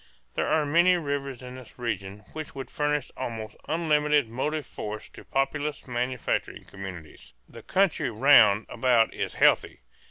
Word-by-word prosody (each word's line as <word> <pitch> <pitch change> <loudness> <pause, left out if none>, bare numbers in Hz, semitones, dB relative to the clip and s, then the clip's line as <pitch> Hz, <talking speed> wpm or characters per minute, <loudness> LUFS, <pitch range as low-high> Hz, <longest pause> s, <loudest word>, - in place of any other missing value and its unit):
There - - -1
are 155 -1 +2
many 170 +5 +4
rivers 140 -5 -4
in 125 0 -8
this 130 - -13
region 105 -4 -4
which 155 -2 -7
would 135 -1 -7
furnish 150 0 -1
almost 115 -4 -5
unlimited 150 -5 +2
motive 150 +5 -2
force 105 0 -6
to - - -13
populous 145 +2 -2
manufacturing 125 0 -2
communities. 95 -5 -10
The - - -12
country 195 -3 +1
round 110 -3 +6
about 120 -3 +2
is - - -4
healthy. - - +3
135 Hz, 140 wpm, -27 LUFS, 115-150 Hz, -, round